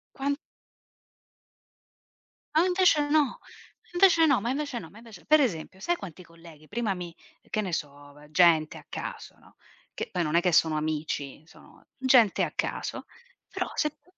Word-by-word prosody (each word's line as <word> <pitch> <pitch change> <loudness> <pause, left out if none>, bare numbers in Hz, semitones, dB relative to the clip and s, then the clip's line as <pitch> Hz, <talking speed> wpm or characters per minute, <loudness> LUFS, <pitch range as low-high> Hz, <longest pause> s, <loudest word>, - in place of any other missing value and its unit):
quan 280 +1 -1 2.2
A 320 +3 +5
invece 360 -5 +3
no, 295 -4 +2 0.5
invece 350 -2 +5
no, 280 -4 +4
ma 230 +4 -3
invece 285 -2 -3
no, 165 - -10
ma 210 - -14
invece 225 -6 -14
per 310 0 +5
esempio 185 - -2
sai 345 - 0
quanti 185 - -10
colleghi 165 -2 -16
prima 220 0 -1
mi 175 -2 -8 0.3
che 215 - -1
ne 190 -4 -4
so 145 -2 -5
v 150 +1 -17
gente 160 -1 +4
a - - -14
caso, - - -7
no, - - -22 0.4
che - - -4
poi 180 - -1
non 155 0 -1
è 170 - +5
che 180 0 +1
sono 160 -1 +4
amici, 150 -2 -3
sono - - -19
gente 255 -5 +4
a - - -2
caso, - - -3 0.5
però - - -3
se 300 - +1
t 300 - -32
190 Hz, 170 wpm, -27 LUFS, -, 2.2 s, A